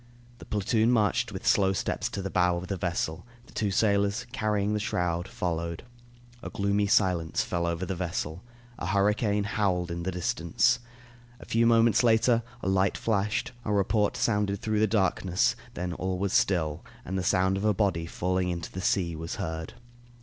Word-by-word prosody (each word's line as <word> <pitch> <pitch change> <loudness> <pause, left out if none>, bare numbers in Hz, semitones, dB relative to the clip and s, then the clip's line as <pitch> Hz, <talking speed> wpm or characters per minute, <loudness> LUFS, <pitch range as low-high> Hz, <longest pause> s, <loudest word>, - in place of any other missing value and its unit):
The - - -11
platoon 110 +3 +1
marched 105 -5 +2
with - - -7
slow 95 -1 +4
steps - - -2
to 100 - -5
the 95 - -4
bow 90 -1 +2
of 90 +1 -6
the 100 - -1
vessel. 85 -3 -2 0.2
The - - -18
two 105 - 0
sailors, 100 +2 +1
carrying 105 -4 0
the 105 - 0
shroud, 90 -3 -1
followed. 85 -1 -3 0.6
A - - -6
gloomy 100 0 0
silence 90 -5 +2
fell 85 -1 -2
over 85 +2 -2
the 95 - -3
vessel. 85 -2 -3 0.4
A - - -3
hurricane 105 +2 +2
howled 95 -4 0
in 85 0 -4
the 95 +2 -2
distance. 90 +6 +1 0.6
A - - -11
few 115 +1 +2
moments 115 -2 +4
later, 115 0 +4 0.2
a - - -2
light 95 0 +2
flashed, 105 0 0
a 105 - -2
report 105 +1 +1
sounded 105 -3 +1
through 110 -1 -1
the 110 - +4
darkness, 95 -3 +1 0.2
then 90 0 -3
all 95 +2 -2
was 100 +1 -1
still, 80 -3 +1 0.2
and 95 - -4
the 95 - 0
sound 95 +1 +2
of 95 - -3
a 105 - +4
body 90 -5 0
falling 90 +1 -1
into 85 -2 -4
the 95 - -5
sea 90 -2 +1
was 80 +5 -5
heard. 80 -6 -5
95 Hz, 180 wpm, -28 LUFS, 90-105 Hz, 0.6 s, slow